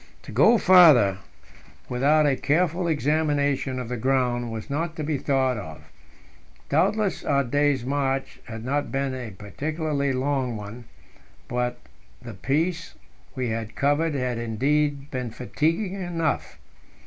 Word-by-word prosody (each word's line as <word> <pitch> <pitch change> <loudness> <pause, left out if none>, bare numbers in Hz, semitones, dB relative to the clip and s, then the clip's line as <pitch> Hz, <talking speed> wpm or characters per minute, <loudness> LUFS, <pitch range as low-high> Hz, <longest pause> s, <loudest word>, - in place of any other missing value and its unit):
To - - -10
go 235 +1 +5
farther 155 - +6 0.7
without 145 +5 +3
a 140 -2 +3
careful 170 +5 +1
examination 145 -3 0
of 125 -2 -4
the 125 +1 -4
ground 125 -1 0
was 110 -1 -6
not 160 +3 -3
to 155 - -4
be 150 -2 -1
thought 130 -3 +1
of. 80 -6 -8 0.9
Doubtless, 210 -2 +1
our 140 -1 +2
day's 145 -1 +1
march 135 0 -2
had 115 0 -8
not 145 +2 -1
been 135 -1 -1
a 125 -3 -5
particularly 145 - -2
long 130 -2 -1
one, 105 +4 -9 0.6
but 125 0 -2 0.4
the 120 - -9
piece 160 - -2 0.4
we 130 -3 -2
had 110 -1 -4
covered 145 +4 +1
had 125 -3 -2
indeed 140 +5 0
been 125 -2 -3
fatiguing 165 - -2
enough. 165 -3 -2
140 Hz, 135 wpm, -25 LUFS, 125-155 Hz, 0.9 s, farther